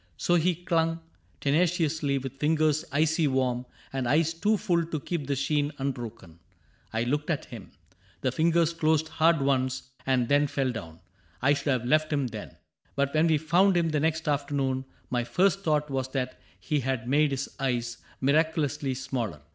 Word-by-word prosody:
So 175 - +1
he 175 +1 +3
clung, 165 -1 0 0.4
Tenaciously, 155 -2 +1
with 135 0 -6
fingers 155 0 +2
icy 155 +2 +2
warm. 130 -2 0 0.3
And 130 -2 -1
eyes 160 +3 +3
too 210 +6 +1
full 170 -3 +1
to 160 -2 -3
keep 150 -1 -4
the 140 - 0
sheen 145 +2 0
unbroken. 115 -10 -5 0.5
I 115 +1 0
looked 145 +6 -1
at 155 -4 -1
him. 115 -6 -10 0.5
The 130 - +1
fingers 165 +3 +2
closed 160 -1 +1
hard 160 -2 +3
once, 130 -1 0
And 130 -3 +1
then 145 +2 +3
fell 135 -2 -1
down. 85 -8 -8 0.2
— 85 +1 -33
I 145 +2 +5
should 140 0 -3
have 130 -4 +1
left 155 +4 +2
him 140 -3 +1
then. 110 -8 -7 0.4
But 140 0 0
when 155 +2 +4
we 160 -2 +4
found 175 +5 +3
him 170 -1 +2
the 155 -1 0
next 160 +1 0
afternoon. 140 -2 0 0.3
My 120 -1 +1
first 190 +10 +2
thought 150 -5 0
was 130 -1 -1
that 130 -2 -2 0.2
he 150 -2 -1
had 130 -2 -2
made 145 +3 +3
his 135 -1 -4
eyes 120 -3 -1 0.2
Miraculously 150 -1 +1
smaller. 115 - -4
145 Hz, 175 wpm, -27 LUFS, 130-160 Hz, 0.5 s, I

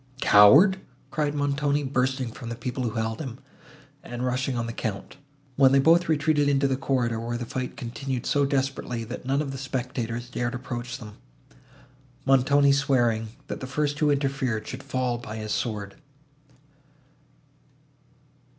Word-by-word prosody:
"Coward!" 145 - +7 0.3
cried 150 -1 -1
Montoni, 145 0 0
bursting 130 -2 -1
from 115 0 -8
the 115 - -4
people 125 +1 -4
who 115 - -3
held 110 0 -2
him, 130 -5 -6 0.6
and 120 +1 -5
rushing 130 0 -1
on 120 - -1
the 115 - -5
Count, 110 +1 -5 0.4
when 135 -1 +6
they - - +6
both 165 +4 +4
retreated 150 -1 +2
into 140 0 +2
the 135 - +1
corridor, 125 -4 0
where 120 +1 -3
the 120 - -5
fight 125 +2 -5
continued 125 0 -4
so 145 - +2
desperately, 135 -3 -1
that 125 +2 -7
none 140 +2 +1
of 140 - -5
the 135 - -6
spectators 120 -3 -3
dared 120 0 -2
approach 120 -1 -5
them, 105 -5 -11 1.1
Montoni 140 +2 +4
swearing, 120 -5 +2 0.2
that - - -5
the 130 - -6
first 145 +2 -1
who 150 - +3
interfered, 135 -5 -1
should 130 - -6
fall 130 -3 -2
by 110 -2 -7
his 110 -1 -5
sword. 105 -4 -2
130 Hz, 155 wpm, -26 LUFS, 120-140 Hz, 1.1 s, Coward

